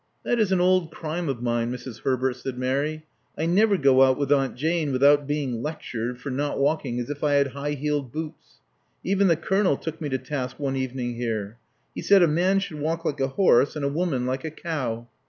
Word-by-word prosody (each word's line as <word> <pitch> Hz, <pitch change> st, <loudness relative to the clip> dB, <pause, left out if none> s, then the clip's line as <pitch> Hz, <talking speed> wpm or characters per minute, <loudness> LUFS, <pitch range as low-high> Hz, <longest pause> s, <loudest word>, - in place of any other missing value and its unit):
" -, -, -45 dB
That 240 Hz, -, +1 dB
is 210 Hz, -3 st, +2 dB
an 190 Hz, -, +3 dB
old 180 Hz, -2 st, +3 dB
crime 160 Hz, 0 st, -4 dB
of 120 Hz, -3 st, -3 dB
mine, 120 Hz, 0 st, 0 dB
Mrs. 125 Hz, -1 st, -7 dB
Herbert," 130 Hz, -1 st, 0 dB
said 130 Hz, 0 st, -6 dB
Mary. 140 Hz, +5 st, -1 dB, 0.3 s
I 160 Hz, -, -1 dB
never 200 Hz, +4 st, +3 dB
go 135 Hz, -4 st, +4 dB
out 130 Hz, -1 st, +5 dB
with 140 Hz, -1 st, -1 dB
Aunt 135 Hz, -2 st, +2 dB
Jane 160 Hz, +1 st, 0 dB
without 140 Hz, +2 st, +4 dB
being 140 Hz, -6 st, -2 dB
lectured 125 Hz, -5 st, -4 dB
for 135 Hz, +2 st, -5 dB
not 145 Hz, +3 st, -2 dB
walking 140 Hz, -4 st, 0 dB
as 120 Hz, +3 st, -4 dB
if 145 Hz, +1 st, -6 dB
I 145 Hz, -1 st, +2 dB
had 140 Hz, -1 st, +3 dB
high 140 Hz, +2 st, -4 dB
heeled 145 Hz, -2 st, -2 dB
boots. 155 Hz, +2 st, -8 dB, 0.4 s
Even 195 Hz, +1 st, +2 dB
the 170 Hz, -, +4 dB
Colonel 190 Hz, -2 st, +1 dB
took 160 Hz, 0 st, -6 dB
me 150 Hz, -, -2 dB
too 130 Hz, -, 0 dB
task 130 Hz, 0 st, -5 dB
one 135 Hz, -2 st, -1 dB
evening 125 Hz, -2 st, -3 dB
here^ 110 Hz, -2 st, -3 dB, 0.4 s
He -, -, -5 dB
said 195 Hz, -2 st, +5 dB
a -, -, +5 dB
man 180 Hz, +5 st, +2 dB
should 195 Hz, -6 st, -3 dB
walk 165 Hz, +3 st, -2 dB
like 145 Hz, -2 st, -1 dB
a 135 Hz, -, +1 dB
horse, 140 Hz, -2 st, +3 dB
and 150 Hz, -2 st, -2 dB
a -, -, +1 dB
woman 145 Hz, -5 st, -1 dB
like 130 Hz, +1 st, -2 dB
a 160 Hz, -, -3 dB
cow. 130 Hz, -8 st, -4 dB
145 Hz, 225 wpm, -25 LUFS, 130-160 Hz, 0.4 s, out